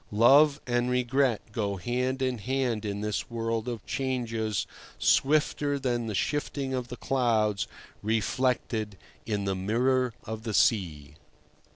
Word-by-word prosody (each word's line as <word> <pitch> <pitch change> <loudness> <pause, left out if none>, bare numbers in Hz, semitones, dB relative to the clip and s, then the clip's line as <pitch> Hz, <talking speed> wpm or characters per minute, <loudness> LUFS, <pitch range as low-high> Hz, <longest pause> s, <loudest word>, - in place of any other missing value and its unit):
Love 140 +5 +6
and 120 0 +1
regret 125 -1 +2
go 105 -4 -1
hand 125 +6 -1
in 130 -3 -1
hand 125 -2 -1
in 100 0 -3
this 105 -1 -2
world 115 0 -2
of 120 -4 -5
changes 115 -5 -1 0.3
swifter 145 0 +2
than 120 -4 -1
the 105 - -3
shifting 140 +1 -1
of 125 -2 -2
the 125 0 -7
clouds 110 -6 +1 0.3
reflected 110 -1 0 0.3
in 105 -2 -1
the 95 - 0
mirror 120 +5 +1
of 110 0 -6
the 110 -2 -3
sea. 80 -10 +1
120 Hz, 135 wpm, -28 LUFS, 105-130 Hz, 0.3 s, Love